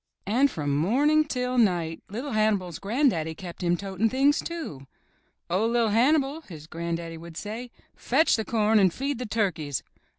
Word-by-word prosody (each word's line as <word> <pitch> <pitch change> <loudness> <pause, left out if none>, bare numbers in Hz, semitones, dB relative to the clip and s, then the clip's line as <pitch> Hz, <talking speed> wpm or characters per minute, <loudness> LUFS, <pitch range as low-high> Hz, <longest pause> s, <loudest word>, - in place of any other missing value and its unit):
And 250 +8 +3
from 145 - -2
morning 265 - +3
until 250 -4 0
night 175 -7 +1
LiT 245 +6 -5
Hannibal's 205 -6 0
gran'daddy 200 - 0
kept 175 +1 -9
him 175 -1 +1
toting 195 +3 -1
things, 275 +4 +3
too. 300 - -6 0.6
"Oh, 190 +6 +1
LiT 230 -2 +2
Hannibal," 275 +6 +2
his 160 - -11
gran'daddy 165 0 -5
would 165 -1 -10
say, 225 +4 -6 0.3
"fetch 295 +7 +2
the 220 - -1
corn 220 -1 +2
and 190 -3 +4
feed 275 +4 -3
the 250 - -4
turkeys." 170 - -1
215 Hz, 160 wpm, -26 LUFS, 170-255 Hz, 0.6 s, and